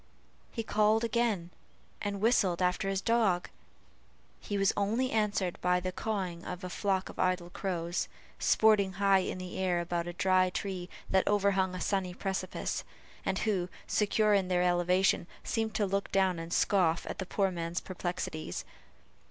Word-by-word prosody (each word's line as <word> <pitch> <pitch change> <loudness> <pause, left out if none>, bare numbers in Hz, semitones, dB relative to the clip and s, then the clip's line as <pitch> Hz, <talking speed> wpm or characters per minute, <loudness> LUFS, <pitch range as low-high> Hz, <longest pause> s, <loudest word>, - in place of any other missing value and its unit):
He 230 - -4
again - - -12
called 215 +2 +4 1.0
and 200 -1 -3
whistled 205 -6 +3
after 180 +1 +1
his 195 0 0
dog; 215 -6 +2 0.9
he 205 - -3
was 195 0 +3
only 225 +6 0
answered 205 -5 0
by 180 0 +3
the 185 +1 -3
cawing 185 -4 -3
of 180 +1 -6
a 180 - -5
flock 190 -1 0
of - - -11
idle 180 -1 0
crows, 175 -3 -2 0.3
sporting 210 -3 +4
high 195 0 +4
in 185 - -3
the 185 0 -6
air 180 -2 +1
about 175 0 -2
a 175 - -4
dry 185 +1 +3
tree 185 -1 -4 0.2
that 190 0 +3
overhung 195 -2 +2
a - - -4
sunny 185 -2 -1
precipice; 190 -1 -3 0.4
and - - +1
who, 185 -5 0 0.2
secure 210 0 +2
in 195 -2 +3
their 180 -1 +2
elevation, 180 0 +2 0.2
seemed 225 -1 -1
to 210 - +2
look 200 +1 -1
down 190 -3 +2
and 165 +1 -7
scoff 175 -4 +2
at - - -6
the 190 - -2
poor 195 0 +1
man's 170 0 -3
perplexities. 175 -3 -4
190 Hz, 160 wpm, -31 LUFS, 180-200 Hz, 1.0 s, called